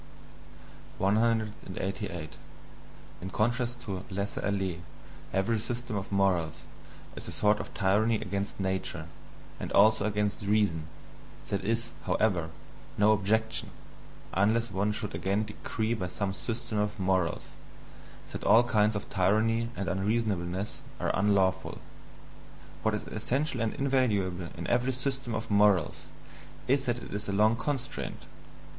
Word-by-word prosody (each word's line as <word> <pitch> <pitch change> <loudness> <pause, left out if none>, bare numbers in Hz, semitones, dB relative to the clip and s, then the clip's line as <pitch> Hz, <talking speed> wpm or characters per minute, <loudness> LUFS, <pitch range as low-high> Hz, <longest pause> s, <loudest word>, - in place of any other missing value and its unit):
188. 100 -5 -1 0.8
In 95 - -4
contrast 120 +4 0
to 95 -5 -4
laisser 100 +1 -3
aller, 95 -4 0 0.5
every 110 +4 +1
system 120 +1 -4
of 100 0 -4
morals 95 -5 +1 0.5
is - - -7
a - - -5
sort 105 0 +3
of - - -6
tyranny 105 +4 +3
against 100 -1 -3
"nature" 95 -5 -2 0.5
and - - -4
also 110 +1 +6
against 105 -1 0
"reason", 100 -6 +1 0.6
that 100 -1 -1
is, 115 +3 0
however, 90 -7 +1 0.5
no 105 +1 +5
objection, 110 +2 +1 0.6
unless 110 +5 +2
one 100 +2 +1
should 105 0 -4
again 100 +3 0
decree 110 +1 -2
by 95 -6 -2
some 95 +2 -2
system 115 +1 -3
of 105 0 -1
morals, 95 -3 +1 0.8
that - - -5
all 115 +2 +7
kinds 110 -2 +3
of 100 - -3
tyranny 110 +4 +2
and 100 - -3
unreasonableness 100 0 -1 0.2
are - - +1
unlawful 100 -2 +2 1.0
What - - +1
is - - -4
essential 135 -1 -1
and 115 -1 +1
invaluable 105 -10 +1
in 85 - -4
every 125 +2 +2
system 135 -2 -2
of 110 0 -4
morals, 100 -5 +3 0.6
is 135 +1 +2
that 120 -1 +1
it - - -8
is 100 0 -3
a - - 0
long 105 +3 +4
constraint. 135 +2 -3
105 Hz, 130 wpm, -30 LUFS, 95-115 Hz, 1.0 s, all